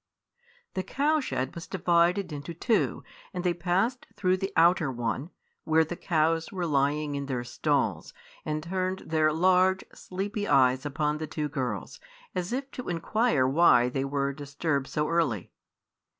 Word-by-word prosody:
The 190 Hz, -, -1 dB
cow 290 Hz, +10 st, +1 dB
shed 135 Hz, -, -2 dB
was 170 Hz, +2 st, -8 dB
divided 175 Hz, 0 st, +2 dB
into 150 Hz, +4 st, -6 dB
two, 220 Hz, +5 st, 0 dB, 0.3 s
and 180 Hz, -, -2 dB
they 180 Hz, -1 st, +2 dB
passed 185 Hz, +9 st, 0 dB
through 185 Hz, -1 st, +2 dB
the 195 Hz, +1 st, -3 dB
outer 165 Hz, -3 st, +4 dB
one, 120 Hz, -, -3 dB, 0.3 s
where 160 Hz, 0 st, +4 dB
the 175 Hz, -, -5 dB
cows 165 Hz, -1 st, 0 dB
were 180 Hz, -3 st, -2 dB
lying 145 Hz, 0 st, +1 dB
in 140 Hz, -1 st, -3 dB
their 125 Hz, -3 st, -2 dB
stalls, 120 Hz, -, -1 dB, 0.3 s
and 155 Hz, 0 st, -3 dB
turned 185 Hz, +2 st, -2 dB
their 155 Hz, -1 st, +2 dB
large, 185 Hz, +3 st, +3 dB
sleepy 200 Hz, +3 st, -4 dB
eyes 130 Hz, +1 st, +3 dB
upon 150 Hz, +1 st, -1 dB
the 155 Hz, -, -4 dB
two 150 Hz, -1 st, -3 dB
girls, 130 Hz, -3 st, -4 dB, 0.3 s
as 180 Hz, +2 st, -3 dB
if 270 Hz, +2 st, -3 dB
to 250 Hz, -, -6 dB
inquire 175 Hz, -, +1 dB
why 130 Hz, -4 st, +5 dB
they 135 Hz, +2 st, -2 dB
were 140 Hz, 0 st, -1 dB
disturbed 145 Hz, 0 st, -2 dB
so 150 Hz, 0 st, -1 dB
early. 150 Hz, -, 0 dB
165 Hz, 155 wpm, -28 LUFS, 140-185 Hz, 0.3 s, why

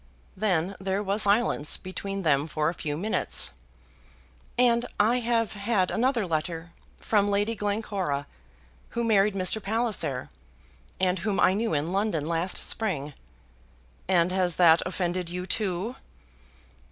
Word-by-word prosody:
Then 190 Hz, -3 st, 0 dB
there 190 Hz, +2 st, -1 dB
was 200 Hz, +2 st, -1 dB
silence 200 Hz, -7 st, +3 dB
between 195 Hz, +1 st, -5 dB
them 145 Hz, -2 st, +2 dB
for 155 Hz, 0 st, 0 dB
a -, -, -3 dB
few 150 Hz, -4 st, -4 dB
minutes. 175 Hz, -, -1 dB, 1.0 s
"And 240 Hz, -1 st, +3 dB
I 230 Hz, +4 st, +4 dB
have 230 Hz, -2 st, 0 dB
had 200 Hz, -2 st, 0 dB
another 240 Hz, -2 st, +1 dB
letter, 165 Hz, 0 st, -3 dB, 0.3 s
from 205 Hz, -2 st, +2 dB
Lady 205 Hz, +3 st, +1 dB
Glencora, 200 Hz, -8 st, -2 dB, 0.7 s
who 235 Hz, -, +1 dB
married 210 Hz, -3 st, +3 dB
Mr. 190 Hz, +3 st, +2 dB
Palliser, 205 Hz, -, -1 dB, 0.7 s
and 185 Hz, -1 st, +1 dB
whom 200 Hz, +2 st, -1 dB
I 185 Hz, -, +5 dB
knew 215 Hz, -4 st, 0 dB
in 150 Hz, +4 st, -1 dB
London 195 Hz, -6 st, 0 dB
last 170 Hz, +3 st, -1 dB
spring." 155 Hz, -10 st, -2 dB, 0.9 s
"And 180 Hz, -1 st, +3 dB
has 185 Hz, -2 st, +1 dB
that 165 Hz, -2 st, +6 dB
offended 180 Hz, -1 st, -2 dB
you, 180 Hz, +1 st, -4 dB
too?" 200 Hz, +3 st, -1 dB
190 Hz, 130 wpm, -27 LUFS, 170-215 Hz, 1.0 s, that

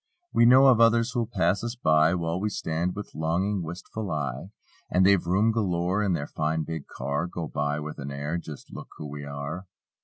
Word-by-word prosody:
We 115 Hz, -, +5 dB
know 130 Hz, +2 st, +7 dB
of 125 Hz, -4 st, +6 dB
others 115 Hz, +1 st, +4 dB
who'll 120 Hz, -3 st, -1 dB
pass 95 Hz, -1 st, +1 dB
us 120 Hz, +1 st, -3 dB
by. 80 Hz, -6 st, +3 dB
While 85 Hz, 0 st, -1 dB
we 105 Hz, -, 0 dB
stand 85 Hz, -2 st, -2 dB
with 105 Hz, 0 st, -7 dB
longing, 90 Hz, +5 st, 0 dB
wistful 90 Hz, +5 st, -6 dB
eye; 75 Hz, +1 st, -3 dB, 0.4 s
And 95 Hz, +1 st, +3 dB
they've 100 Hz, -2 st, +5 dB
room 95 Hz, +6 st, +2 dB
galore 95 Hz, -3 st, 0 dB
in 100 Hz, -3 st, +1 dB
their 75 Hz, -4 st, -1 dB
fine 80 Hz, +1 st, -1 dB
big 80 Hz, -2 st, -6 dB
car. 70 Hz, +5 st, -3 dB
Go 85 Hz, -2 st, -5 dB
by 75 Hz, 0 st, -1 dB
with 75 Hz, 0 st, -6 dB
an 70 Hz, 0 st, -5 dB
air: 70 Hz, +5 st, -3 dB
"Just 75 Hz, -4 st, -10 dB
look -, -, -8 dB
who 75 Hz, -, -7 dB
we 70 Hz, 0 st, -7 dB
are." 70 Hz, +6 st, -6 dB
85 Hz, 205 wpm, -27 LUFS, 75-100 Hz, 0.4 s, know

